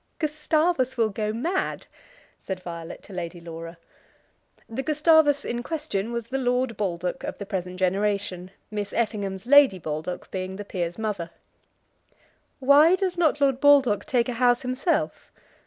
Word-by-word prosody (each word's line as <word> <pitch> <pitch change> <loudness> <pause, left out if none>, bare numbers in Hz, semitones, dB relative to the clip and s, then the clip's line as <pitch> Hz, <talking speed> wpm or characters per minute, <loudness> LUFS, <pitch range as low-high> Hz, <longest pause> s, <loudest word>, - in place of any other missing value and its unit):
"Gustavus 305 -3 0
will 225 -2 +3
go 210 +1 -2
mad," 330 - -2 0.6
said 185 -1 -5
Violet 170 -2 -7
to 200 - -12
Lady 175 -1 -5
Laura. 165 0 -8 0.9
The 230 +4 -4
Gustavus 300 -1 +3
in 240 0 -2
question 240 -8 -3
was 235 -1 -3
the 265 +3 -3
Lord 250 -1 0
Baldock 180 -3 -3
of - - -5
the 200 - -6
present 185 -2 -4
generation, 190 -1 -1 0.2
Miss 205 -1 -4
Effingham's 205 -4 -2
Lady 280 -6 +6
Baldock 160 +1 -5
being 185 0 -4
the 205 +1 -7
peer's 175 -3 -3
mother. 210 -6 -3 1.3
"Why 285 +6 +6
does 375 -1 -1
not 315 -4 +2
Lord 270 -2 +2
Baldock 275 -7 +5
take 240 -2 +1
a 250 - -2
house 245 +1 +2
himself?" 255 +7 -1
225 Hz, 145 wpm, -25 LUFS, 185-280 Hz, 1.3 s, Lady